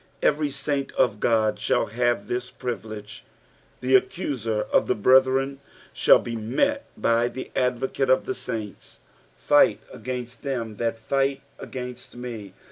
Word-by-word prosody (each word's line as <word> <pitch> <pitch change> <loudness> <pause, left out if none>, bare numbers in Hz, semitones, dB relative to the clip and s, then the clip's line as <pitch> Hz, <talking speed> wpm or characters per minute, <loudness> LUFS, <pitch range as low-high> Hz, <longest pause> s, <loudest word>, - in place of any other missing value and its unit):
Every 150 0 +2
saint 140 0 -2
of 105 -4 +2
God 110 -2 +2
shall 105 - +1
have 120 -1 0
this 125 +1 -3
privilege: 110 -5 -6 0.6
the 130 +1 0
kccuaer 115 - -3
of - - +3
the - - +2
brethren 130 +4 +4 0.3
shall - - +6
be 115 - -5
met 275 - 0
faj 115 +1 +2
the 130 - -7
Advocate 130 +1 0
of 130 - +4
the - - -2
uints. 105 -3 -6 0.2
" - - -34
f\fkt - - +5 0.2
agattut 125 -1 -6
them 115 -6 -3
that 115 0 -1
Jight 135 0 +1 0.2
against 125 -1 -7
me." 120 -5 -7
125 Hz, 140 wpm, -25 LUFS, 115-135 Hz, 0.6 s, shall